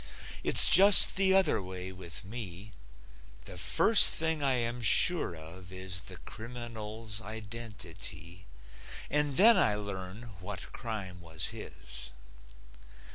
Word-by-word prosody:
It's - - +6
just 195 +2 +8
the 190 0 0
other 190 - 0
way 95 0 -10
with 90 -1 -11
me: 100 -2 -8 0.7
The 90 - -12
first 200 - +5
thing 160 -1 -2
I 135 -2 -1
am 120 0 -5
sure 155 - +2
of 85 +3 -14
is 95 -1 -7
The - - -12
criminal's 110 -2 -8
identity, 100 -5 -10 0.6
And 150 -2 -2
then 225 +4 +5
I 105 - 0
learn 100 +2 -10
what 95 0 -9
crime 100 -6 -9
was 80 -2 -3
his. - - -6
105 Hz, 120 wpm, -27 LUFS, 90-120 Hz, 0.7 s, just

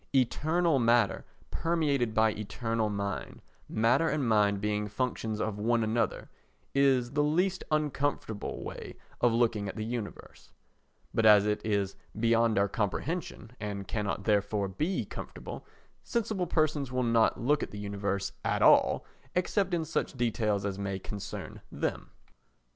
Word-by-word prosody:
Eternal 155 +5 +2
matter 115 -4 +3 0.3
permeated 145 -9 0
by 110 0 +4
eternal 110 +1 -2
mind, 100 -1 -4 0.3
matter 125 +9 +3
and 145 -3 0
mind 105 -2 +3
being 105 0 -1
functions 110 -1 -2
of 105 -2 -2
one 115 +2 +2
another, 110 -1 0 0.5
is 135 -3 +3
the 145 +1 +1
least 180 +6 +1
uncomfortable 145 -7 -1
way - - -7 0.3
of 120 - +5
looking 115 -3 +1
at - - -7
the 110 -1 -3
universe; 115 -2 -6 0.6
but 115 - +1
as 105 -2 +7
it 105 0 0
is 100 -3 0 0.2
beyond 115 -1 +3
our 100 0 +4
comprehension, 115 - -3
and 100 -2 -4
cannot 105 -2 -2
therefore 100 -1 +1
be 155 - -1
comfortable, - - -8 0.4
sensible 215 -6 -1
persons 155 -5 +1
will 125 0 0
not 115 -1 +3
look 145 +5 +2
at - - -3
the 105 - -9
universe 100 -1 -2
at - - +1
all - - +5 0.3
except 185 +2 +1
in 170 -2 0
such 155 - -2
details 110 -4 0
as 100 -1 -3
may 100 -1 -2
concern 100 +1 -7
them. - - -3
115 Hz, 140 wpm, -30 LUFS, 105-140 Hz, 0.6 s, as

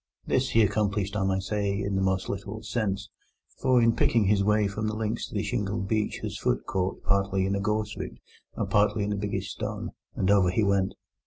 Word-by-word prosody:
This 130 0 +1
he 115 - +4
accomplished, 100 -1 0
I 100 - +1
may 95 0 +1
say, 100 0 -1
in 100 -1 -2
the 95 - +1
most 95 0 +1
literal 100 +3 -5
sense, 100 -2 -2 0.5
for 130 -2 +4
in 115 -1 +4
picking 115 -2 +3
his 100 0 +3
way 105 0 +3
from 105 +2 -3
the 105 - -2
links 110 +1 -2
to - - -10
the 105 - 0
shingle 105 -2 -1
beach 105 +2 -1
his - - -4
foot - - 0
caught, 95 0 -2
partly 100 -1 +1
in 95 - 0
a 100 - 0
gorse 105 +1 -1
root - - -6 0.4
and - - -2
partly 105 0 +2
in 105 +1 -1
a - - -1
biggish 100 0 -3
stone, - - -4 0.2
and 95 - +2
over 100 -3 +5
he 105 +5 +1
went. 100 -1 +1
100 Hz, 220 wpm, -27 LUFS, 95-110 Hz, 0.5 s, over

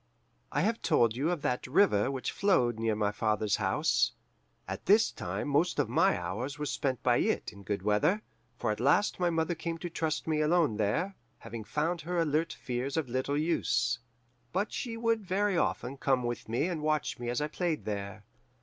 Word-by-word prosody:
"I - - +1
have 225 +2 0
told 115 -2 +3
you 140 +6 0
of 175 -5 -2
that 125 +1 -1
river 130 - +3
which 135 -2 -3
flowed 125 - +2
near 110 -1 +1
my 105 -1 +1
father's 105 -1 +1
house. - - +2 0.5
At - - -6
this 215 +4 +5
time - - -4
most 150 +5 +2
of - - +1
my - - +3
hours 105 +11 -4
were 150 - -3
spent 130 -4 -2
by - - +4
it - - 0
in 100 - -12
good 100 -1 -3
weather, 105 - +2 0.3
for - - 0
at 105 - -3
last 145 - +3
my 175 -1 +2
mother 165 +1 0
came 165 0 -4
to 175 +1 -6
trust 160 -2 -1
me 155 -1 +1
alone 155 -7 +2
there, 110 - 0 0.2
having 115 -1 -7
found 160 +8 -1
her 175 +3 -3
alert 160 0 +1
fears 125 +4 -3
of 150 -6 -1
little 130 +3 -1
use. 120 -6 +1 0.5
But 200 +4 -1
she 230 -3 -3
would 230 -1 +1
very 195 +1 +1
often 140 -5 -1
come 135 -2 +1
with 120 -2 -4
me 120 +6 +1
and 170 -4 -2
watch 155 -3 0
me 120 -1 -3
as 120 - 0
I 150 - 0
played 170 -1 -2
there. 100 0 -4
145 Hz, 195 wpm, -30 LUFS, 115-170 Hz, 0.5 s, this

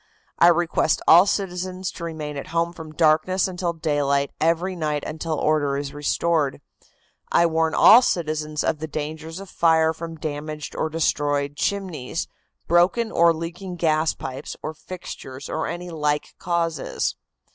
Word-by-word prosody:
"I 170 - +7
request 170 -2 +2
all 175 +4 +8
citizens 185 -1 -2
to - - -9
remain 155 -3 -5
at 140 - -6
home 170 +1 -1
from 160 -3 -9
darkness 160 +5 +2
until 180 -2 -2
daylight 145 -3 0
every 170 +4 +1
night 150 -3 -2
until 160 0 -3
order 145 -2 +1
is 140 0 -4
restored. 145 0 0 0.7
"I 170 - +5
warn 160 -1 +1
all 235 +3 +8
citizens 155 -7 -1
of 155 - 0
the 160 - -4
danger 155 +1 -5
of 185 +5 -8
fire 160 -2 +3
from 165 +1 -7
damaged 150 0 -5
or 160 - -1
destroyed 145 -2 0
chimneys, 170 -6 -2 0.4
broken 185 +7 +3
or 170 0 +5
leaking 175 +3 -5
gas 160 -2 +1
pipes 135 +2 -7
or 155 - -4
fixtures 145 -5 -9
or 160 - -2
any 175 0 -5
like 150 -2 -1
causes." 170 -4 -1
160 Hz, 145 wpm, -23 LUFS, 150-175 Hz, 0.7 s, all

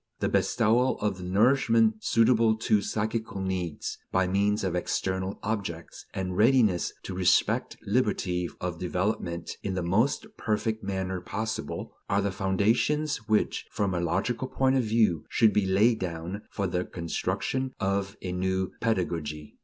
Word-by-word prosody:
The - - 0
bestowal 120 +2 +2
of 100 -3 -1
the - - -7
nourishment 110 +2 +3
suitable 115 -1 +4
to 110 -2 +2
psychical 110 0 -2
needs, 95 -4 -3
by 95 0 +2
means 100 +3 +1
of 95 -3 -1
the 90 - +1
external 95 +2 -2
objects, 95 -7 -4
and 90 -1 -3
readiness 110 -4 +3
to - - -5
respect 90 -1 +2
liberty 100 -6 0
of 90 -2 -4
development 90 -2 -2
in 95 -2 -3
the 90 - -1
most 105 +10 +1
perfect 110 0 -1
manner 95 -1 -2
possible, 110 +5 -4 0.2
are 100 +1 +2
the 100 - 0
foundations 110 +11 +1
which, 110 - +1
from 100 -2 -1
a 85 - 0
logical 110 +9 -1
point 130 0 +2
of 130 - +3
view, 110 -7 +2
should 110 -3 +4
be 100 -2 +2
laid 110 +5 +3
down 90 +3 -4
for 100 - -2
the 90 0 -1
construction 130 +10 -3
of 100 0 -1
a 90 - -3
new 95 +1 -1
pedagogy. 85 -8 -2
100 Hz, 150 wpm, -28 LUFS, 90-110 Hz, 0.2 s, suitable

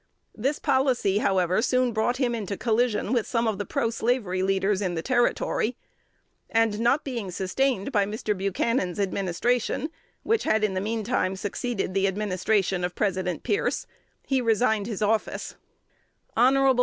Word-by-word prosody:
This 270 +7 -1
policy, 260 -8 +2
however, 185 -1 +2
soon 255 0 +2
brought 230 +3 +1
him 250 -3 +1
into 205 -4 -3
collision 230 -1 +1
with 235 -3 +1
some 230 -1 0
of 215 -3 -1
the 205 - -3
proslavery 230 -6 0
leaders 195 +1 +1
in 180 -3 -1
the 165 - -3
Territory; 240 -1 +1 0.7
and, 225 -2 +2
not 240 +6 +2
being 235 -8 -4
sustained 195 +6 -1
by 205 -5 +2
Mr. 210 0 -2
Buchanan's 195 0 -1
administration, 205 - 0 0.3
which 450 0 +1
had 215 0 +2
in 210 -2 +1
the 185 - -1
mean 220 +2 -2
time 205 -4 0
succeeded 205 0 -3
the 195 0 +2
administration 195 -1 0
of 180 0 -2
President 185 -4 -1
Pierce, 410 - 0 0.4
he 265 -2 +1
resigned 220 -2 +2
his 215 -3 -3
office. 215 +1 -1 0.8
Hon. 265 +2 +4
215 Hz, 150 wpm, -26 LUFS, 195-245 Hz, 0.8 s, Hon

